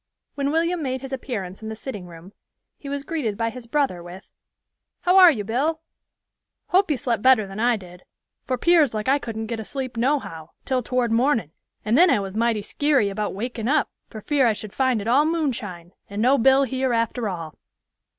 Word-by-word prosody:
When 280 Hz, -1 st, -1 dB
William 335 Hz, +3 st, 0 dB
made 260 Hz, -2 st, -2 dB
his 270 Hz, 0 st, -7 dB
appearance 210 Hz, -8 st, -5 dB
in 220 Hz, -, -6 dB
the 220 Hz, -, -5 dB
sitting 210 Hz, -6 st, -7 dB
room, 170 Hz, +3 st, -13 dB, 0.5 s
he 280 Hz, -, -8 dB
was 280 Hz, 0 st, -3 dB
greeted 270 Hz, -10 st, -3 dB
by 230 Hz, 0 st, -1 dB
his 250 Hz, -1 st, -10 dB
brother 265 Hz, -9 st, 0 dB
with, 175 Hz, +3 st, -12 dB, 0.7 s
"How 360 Hz, +1 st, +3 dB
are 365 Hz, -2 st, +10 dB
you, 230 Hz, -10 st, 0 dB
Bill? 285 Hz, +10 st, -1 dB, 0.9 s
Hope 380 Hz, 0 st, +3 dB
you 295 Hz, -, +1 dB
slept 235 Hz, -3 st, -1 dB
better 255 Hz, -4 st, +5 dB
than 195 Hz, +2 st, -8 dB
I 240 Hz, 0 st, +3 dB
did, 180 Hz, -2 st, -13 dB, 0.4 s
for 255 Hz, -, -2 dB
'pears 315 Hz, -5 st, +3 dB
like 215 Hz, +1 st, -3 dB
I 275 Hz, +2 st, +3 dB
couldn't 225 Hz, -3 st, -5 dB
get 225 Hz, 0 st, -4 dB
asleep 255 Hz, +2 st, -5 dB
nohow, 230 Hz, -, -1 dB, 0.2 s
till 260 Hz, -1 st, 0 dB
toward 245 Hz, -1 st, -1 dB
mornin' 230 Hz, -, +1 dB, 0.3 s
and 220 Hz, +2 st, +2 dB
then 355 Hz, +6 st, +6 dB
I -, -, +3 dB
was 195 Hz, 0 st, -6 dB
mighty 230 Hz, -1 st, +1 dB
skeary 280 Hz, -4 st, +1 dB
about 210 Hz, 0 st, -3 dB
wakin' 230 Hz, +1 st, -4 dB
up, 295 Hz, +2 st, +1 dB, 0.2 s
for 215 Hz, -, -9 dB
fear 275 Hz, +1 st, +2 dB
I 225 Hz, -, +3 dB
should 210 Hz, -1 st, -9 dB
find 260 Hz, -5 st, +1 dB
it 205 Hz, -, -6 dB
all 260 Hz, +5 st, +4 dB
moonshine, 235 Hz, -, -3 dB, 0.2 s
and 200 Hz, +1 st, -5 dB
no 255 Hz, +5 st, +4 dB
Bill 265 Hz, +3 st, +5 dB
here 260 Hz, -1 st, -1 dB
after 230 Hz, -1 st, -1 dB
all." 165 Hz, -4 st, -6 dB
240 Hz, 200 wpm, -23 LUFS, 210-275 Hz, 0.9 s, are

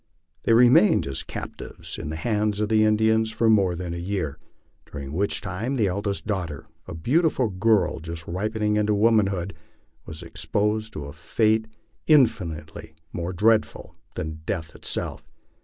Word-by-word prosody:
They 115 Hz, -, +4 dB
remained 120 Hz, -, +6 dB
as 70 Hz, -1 st, -2 dB
captives -, -, -6 dB
in 75 Hz, -, -5 dB
the 80 Hz, -, -4 dB
hands 105 Hz, +4 st, 0 dB
of 105 Hz, -1 st, 0 dB
the 110 Hz, -1 st, +4 dB
Indians 110 Hz, +1 st, +3 dB
for 110 Hz, +1 st, +2 dB
more 95 Hz, -5 st, +3 dB
than 85 Hz, -1 st, -5 dB
a -, -, -4 dB
year, 85 Hz, -5 st, -3 dB, 0.5 s
during 70 Hz, -1 st, -6 dB
which 100 Hz, +5 st, 0 dB
time 105 Hz, +7 st, -3 dB
the 115 Hz, -5 st, +2 dB
eldest 100 Hz, +1 st, -2 dB
daughter, 90 Hz, -9 st, -3 dB, 0.2 s
a -, -, -6 dB
beautiful 130 Hz, -, +1 dB
girl 100 Hz, -3 st, +2 dB
just 85 Hz, 0 st, -7 dB
ripening 105 Hz, +4 st, -1 dB
into 105 Hz, 0 st, +2 dB
womanhood, 100 Hz, -4 st, +2 dB, 0.5 s
was 80 Hz, -1 st, -7 dB
exposed 110 Hz, +1 st, -1 dB
to 75 Hz, -, -6 dB
a 70 Hz, -, -8 dB
fate 110 Hz, +7 st, +1 dB, 0.4 s
infinitely 85 Hz, -, +1 dB, 0.2 s
more 85 Hz, +1 st, -3 dB
dreadful 110 Hz, +4 st, +1 dB, 0.2 s
than 80 Hz, 0 st, -5 dB
death 80 Hz, -5 st, -3 dB
itself. -, -, -4 dB
100 Hz, 150 wpm, -24 LUFS, 85-110 Hz, 0.5 s, remained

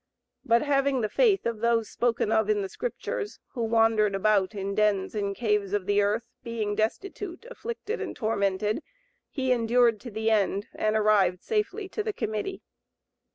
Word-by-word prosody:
But 235 Hz, +2 st, +3 dB
having 275 Hz, -2 st, +2 dB
the 215 Hz, -, -1 dB
faith 425 Hz, -, +3 dB
of 230 Hz, -2 st, -2 dB
those 230 Hz, -1 st, +2 dB
spoken 235 Hz, -2 st, 0 dB
of 220 Hz, -1 st, +2 dB
in 205 Hz, -1 st, +2 dB
the 195 Hz, -, -4 dB
Scriptures, 480 Hz, -, -4 dB
who 245 Hz, -, -5 dB
wandered 225 Hz, -2 st, +3 dB
about 200 Hz, 0 st, +2 dB
in 200 Hz, 0 st, -3 dB
dens 205 Hz, -2 st, +1 dB
and 200 Hz, -2 st, -2 dB
caves 210 Hz, -3 st, 0 dB
of 205 Hz, -3 st, 0 dB
the 205 Hz, +1 st, +3 dB
earth, 210 Hz, +3 st, 0 dB, 0.2 s
being 225 Hz, -3 st, -2 dB
destitute, 350 Hz, -, -3 dB
afflicted 470 Hz, -2 st, -5 dB
and -, -, -4 dB
tormented, 210 Hz, -, 0 dB, 0.5 s
he 260 Hz, -3 st, -1 dB
endured 235 Hz, -1 st, +3 dB
to 240 Hz, -, -8 dB
the 220 Hz, +1 st, -1 dB
end 200 Hz, -1 st, +1 dB
and 215 Hz, 0 st, 0 dB
arrived 200 Hz, -4 st, +3 dB
safely 425 Hz, -2 st, -1 dB
to 430 Hz, -, -3 dB
the 430 Hz, 0 st, -2 dB
Committee. 220 Hz, -, -3 dB
220 Hz, 165 wpm, -27 LUFS, 205-260 Hz, 0.5 s, But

